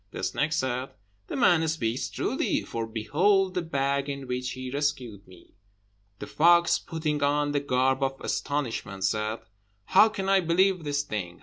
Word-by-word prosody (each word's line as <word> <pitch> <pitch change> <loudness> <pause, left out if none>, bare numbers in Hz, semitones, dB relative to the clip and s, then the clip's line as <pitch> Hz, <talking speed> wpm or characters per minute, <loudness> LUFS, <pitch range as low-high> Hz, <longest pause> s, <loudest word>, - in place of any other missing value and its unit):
The - - -7
snake 150 +2 0
said, 130 -4 -1 0.4
"The - - -5
man 160 -2 +3
speaks 130 -6 -2
truly, - - -1
for 115 -1 -4
behold 180 - +1
the 180 - -1
bag 140 -3 -1
in 140 -1 -5
which 125 0 -3
he 130 0 -6
rescued 130 -8 -3
me." 90 -2 -18 0.6
The - - -7
fox, 170 +2 +4
putting 155 -2 -3
on 145 +1 +1
the 145 - +1
garb 130 -1 +1
of 135 0 -1
astonishment, 120 -9 -3
said, 105 +3 -1 0.4
"How 210 +4 +6
can 195 -3 -4
I 195 0 +4
believe 185 +1 +2
this 145 -1 -1
thing? 95 -9 -5
140 Hz, 165 wpm, -27 LUFS, 125-160 Hz, 0.6 s, How